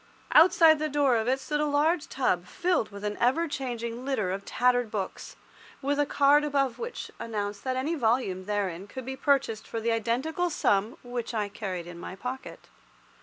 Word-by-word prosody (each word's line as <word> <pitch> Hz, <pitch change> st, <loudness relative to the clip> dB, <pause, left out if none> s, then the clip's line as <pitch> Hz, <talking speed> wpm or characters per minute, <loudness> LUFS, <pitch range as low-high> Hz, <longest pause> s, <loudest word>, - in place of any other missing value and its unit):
Outside 325 Hz, -2 st, +7 dB
the 310 Hz, 0 st, -1 dB
door 280 Hz, -3 st, +3 dB
of 220 Hz, +1 st, -1 dB
it 260 Hz, +2 st, +2 dB
stood 295 Hz, +3 st, -2 dB
a 300 Hz, -, +2 dB
large 300 Hz, +3 st, +1 dB
tub 195 Hz, -9 st, 0 dB
filled 355 Hz, -, 0 dB
with 200 Hz, 0 st, -10 dB
an 210 Hz, 0 st, -2 dB
ever 265 Hz, +8 st, +2 dB
changing 240 Hz, -4 st, -4 dB
litter 245 Hz, -9 st, -1 dB
of 195 Hz, +1 st, -4 dB
tattered 245 Hz, -2 st, +2 dB
books, 200 Hz, -3 st, -5 dB, 0.4 s
with 285 Hz, +1 st, -1 dB
a 290 Hz, -, +2 dB
card 285 Hz, +1 st, +4 dB
above 275 Hz, -4 st, 0 dB
which 475 Hz, +1 st, -6 dB
announced 205 Hz, -2 st, -4 dB
that 260 Hz, -1 st, 0 dB
any 285 Hz, +6 st, -1 dB
volume 225 Hz, -, 0 dB
therein 200 Hz, -3 st, -2 dB
could 260 Hz, +4 st, -8 dB
be 265 Hz, +1 st, -4 dB
purchased 265 Hz, -6 st, +1 dB
for 225 Hz, -, -4 dB
the 230 Hz, +1 st, 0 dB
identical 255 Hz, +11 st, 0 dB
sum 210 Hz, -7 st, +1 dB
which 245 Hz, -1 st, -4 dB
I 210 Hz, -2 st, -1 dB
carried 190 Hz, -4 st, -5 dB
in 175 Hz, 0 st, -9 dB
my 185 Hz, -, -7 dB
pocket. 250 Hz, +6 st, -7 dB
245 Hz, 185 wpm, -28 LUFS, 210-285 Hz, 0.4 s, Outside